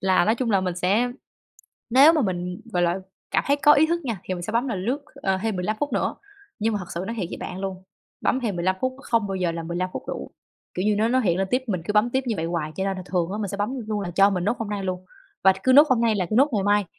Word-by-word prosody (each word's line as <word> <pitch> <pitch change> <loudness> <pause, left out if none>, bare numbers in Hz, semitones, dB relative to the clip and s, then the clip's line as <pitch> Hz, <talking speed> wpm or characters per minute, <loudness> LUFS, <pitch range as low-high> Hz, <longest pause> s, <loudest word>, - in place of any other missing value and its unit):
là 185 -2 +3
nói 220 - +3
chung 240 0 -1
là 195 -2 +3
mình 180 -2 -2
sẽ 205 +7 +1 0.8
nếu 275 +6 +8
mà 315 - +2
mình, 180 -3 -3
gọi 175 -1 +1
là, 175 +2 +1 0.3
cảm - - +1
thấy 285 +1 +3
có 290 +1 +6
ý 295 +2 +5
thức 340 0 -1
nha, 230 -8 -3
thì 185 - -3
mình 175 - -6
sẽ 215 - -4
bấm 240 +4 +1
là 230 - -1
lướt, 245 +10 -2
ờ, 195 -9 -1
thêm 220 -4 -1
15 195 +4 -1
phút 290 - -1
nữa, - - 0 0.4
nhưng 225 +1 0
mà - - 0
thật 185 - -7
sự 170 +2 -3
nói 230 - -4
thiệt 195 -6 -2
với - - -5
bạn 185 +1 -6
luôn, 190 -1 -5 0.4
bấm 260 - +1
thêm 215 -7 -2
15 185 +2 0
phút, 260 0 -1
không 230 -3 +1
bao 195 - -2
giờ 180 -2 0
là 165 0 -4
15 175 +2 -3
phút - - -5
đủ, - - -5 0.4
kiểu 180 - -2
như, 210 -1 +3
nó 220 +2 +2
nó 255 +2 +3
hiện 180 -5 +1
lên 195 - 0
tiếp 255 +1 +1
mình 185 -7 -2
cứ 210 - -2
bấm 215 +3 +3
tiếp 265 +1 0
như 230 -3 -1
vậy 160 - -2
hoài, 165 -3 -3
cho 190 - -1
nên 195 -1 -1
là 185 - -6
thường 175 -1 -1
á 210 - -3
mình 205 - -2
sẽ 200 - -4
bấm 205 +4 -1 0.2
luôn 210 -1 -1
là 180 -3 -4
cho 195 +3 +5
mình 180 -3 -1
nốt 220 +5 0
hôm 225 - -4
nay 200 -2 -3
luôn, 185 -1 -3 0.4
và 190 - +8
cứ 260 - +4
nốt 290 +3 +8
hôm 255 -3 +3
nay 230 -2 +3
là 185 -3 0
cứ - - 0
nốt 275 +4 +5
ngày 205 -3 +1
mai, 205 0 +3
205 Hz, 310 wpm, -24 LUFS, 185-235 Hz, 0.8 s, nếu